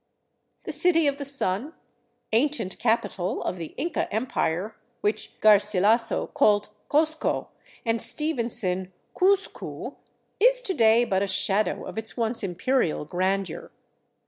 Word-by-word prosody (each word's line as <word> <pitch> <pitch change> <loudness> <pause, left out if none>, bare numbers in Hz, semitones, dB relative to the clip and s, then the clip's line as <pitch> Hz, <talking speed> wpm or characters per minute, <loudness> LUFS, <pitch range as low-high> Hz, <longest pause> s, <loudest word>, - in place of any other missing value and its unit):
The - - -5
City 330 -3 +3
of 280 0 0
the 280 - -4
Sun, 275 - -2 0.6
ancient 235 -4 0
capital 220 -5 0
of 185 - -3
the 165 -2 -8
Inca 335 0 -2
Empire, 210 -4 -1 0.3
which 210 +1 -2
Garsilaso 210 +1 +3
called 205 -1 +3 0.2
Cozco 315 +1 0 0.4
and 225 -1 +1
Stevenson 230 - 0 0.2
Couzcou, 395 +2 -1 0.4
is - - +4
to 385 - -1
day 230 -3 +4
but 190 -4 0
a 200 - 0
shadow 200 +2 +1
of - - -5
its 220 +3 -6
once 230 0 -1
imperial 185 - 0
grandeur. 185 +2 -2
220 Hz, 120 wpm, -25 LUFS, 195-280 Hz, 0.6 s, is